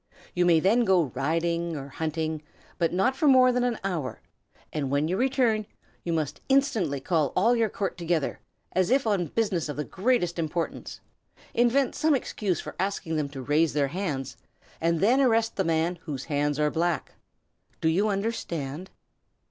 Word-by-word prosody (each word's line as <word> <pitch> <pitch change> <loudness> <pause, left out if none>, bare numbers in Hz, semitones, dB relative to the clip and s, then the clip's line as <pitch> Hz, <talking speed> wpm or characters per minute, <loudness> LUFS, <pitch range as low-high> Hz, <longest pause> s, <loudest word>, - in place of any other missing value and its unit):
You 175 0 +2
may 165 -2 +5
then 215 +8 +3
go 185 -7 +3
hunting 165 +4 -1
or 140 -1 -7
riding, 160 -1 -2 0.4
but 165 -2 +2
not 195 +9 +1
for 300 - +1
more 255 -2 +6
than 250 0 +1
an 245 -2 0
hour; 170 -9 -3 0.5
and 145 -3 -2
when 140 +3 +1
you 180 - 0
return, 240 -3 +1 0.4
you 170 - -2
must 155 -4 -2
instantly 230 - +2
call 155 -1 0
all 230 +6 +4
your 225 -2 +2
court 195 -2 -3
together, 170 -4 -1 0.3
as 185 -1 +1
if 270 0 +3
on 200 -6 +1
business 185 -4 -1
of 145 - -5
the 150 - -1
greatest 185 - 0
importance. 165 +1 -3 0.5
Invent 245 +3 +2
some 310 -2 +2
excuse 200 - -2
for - - -7
asking 190 -4 -2
them 150 -2 -1
to 135 -2 -7
raise 155 +4 +2
their 140 -2 +1
hands, 145 -6 -3 0.4
and 165 0 +1
then 245 +7 +4
arrest 230 -3 +2
the 190 - +1
man 165 +1 0
whose 140 -5 -4
hands 145 -1 0
are 150 0 +2
black. 170 0 -1 0.7
Do - - 0
you 185 +7 +2
understand?" 185 -6 -3
175 Hz, 170 wpm, -27 LUFS, 155-220 Hz, 0.7 s, more